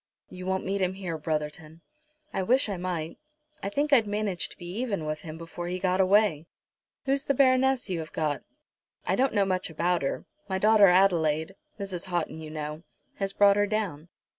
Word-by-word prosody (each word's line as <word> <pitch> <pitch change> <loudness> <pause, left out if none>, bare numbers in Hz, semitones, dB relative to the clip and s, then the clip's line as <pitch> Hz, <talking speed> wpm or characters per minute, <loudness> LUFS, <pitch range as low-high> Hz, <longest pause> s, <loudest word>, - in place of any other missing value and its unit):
"You 185 0 -7
won't 190 0 -1
meet 195 +1 -1
him 185 0 0
here, 185 -4 -4
Brotherton." 155 +1 -4 0.5
"I - - 0
wish 240 +4 +2
I 195 - -2
might. 175 -3 -4 0.4
I 200 - -2
think 290 +7 0
I'd 230 -6 +5
manage 205 -3 -1
to - - -14
be 175 - -10
even 205 -10 -2
with 155 0 -3
him 160 -1 -8
before 165 +1 -7
he 180 +1 -2
got 185 0 +1
away. 190 -5 +3 0.6
Who's 275 0 +1
the 280 - +1
Baroness 260 0 +3
you 180 -4 -2
have 160 0 -7
got?" 150 -2 -1 0.6
"I - - +1
don't 265 -2 +1
know 200 -1 +4
much 185 -1 -1
about 170 +2 0
her. 135 - -2 0.2
My 190 - 0
daughter 210 0 +6
Adelaide, 170 -3 +3 0.3
Mrs. 190 -3 -4
Houghton, 175 -3 -2
you 155 -1 -8
know, 155 0 -5 0.4
has 195 -1 -1
brought 200 0 +5
her 205 0 +3
down. 190 -7 -3
185 Hz, 190 wpm, -27 LUFS, 160-205 Hz, 0.6 s, daughter